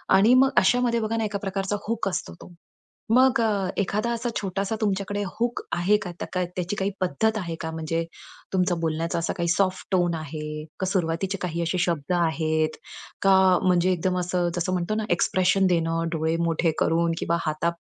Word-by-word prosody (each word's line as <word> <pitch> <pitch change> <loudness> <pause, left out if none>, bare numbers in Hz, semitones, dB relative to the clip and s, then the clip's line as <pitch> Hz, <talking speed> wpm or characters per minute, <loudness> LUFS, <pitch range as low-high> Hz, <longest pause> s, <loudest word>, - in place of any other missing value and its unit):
आणि 210 +6 +6
मग 270 +1 +5
अशामध्ये 235 +3 +3
बघा 225 +1 -1
ना, 225 - 0
एका 205 -1 -2
प्रकारचा 195 0 -2
हूक 230 -3 -1
असतो, 180 - -4
तो. 180 - -12 0.6
मग 260 +1 +5
अ, 205 -4 +1
एखादा 210 +4 0
असा 235 +1 -2
छोटासा 195 +2 -2
तुमच्याकडे 205 0 -1 0.2
हूक 240 +1 0 0.2
आहे 195 +5 +3
का? 180 - -5
त्या - - -4
का 180 -1 +1
त्याची 180 +2 -2
काही 195 0 -1
पद्धत 215 +6 +1
आहे 170 -4 -4
का? 160 - -4
म्हणजे 160 +1 -2 0.5
तुमचा 180 -1 +2
बोलण्याचा 165 +1 -1
असा 165 - -2
काही 170 -1 0
सॉफ्ट 185 +1 0
टोन 175 -2 +2
आहे, 150 -1 -6
का 190 - 0
सुरुवातीचे 190 +1 -1
काही 170 -1 -2
असे 170 +2 -1
शब्द 170 -1 0
आहेत 155 -1 0 0.4
का? 195 -1 +5 0.3
म्हणजे 180 0 +3
एकदम 180 +1 0
असं, 180 -1 0
जसं 180 +2 -1
म्हणतो 180 +4 -1
ना, 215 -1 -1
एक्सप्रेशन 185 +2 +2
देणं, 165 -1 +1
डोळे 160 0 0
मोठे 165 0 +1
करून, 165 +1 +2
किंवा 170 0 0
हाता 155 +2 0
180 Hz, 180 wpm, -25 LUFS, 165-200 Hz, 0.6 s, आणि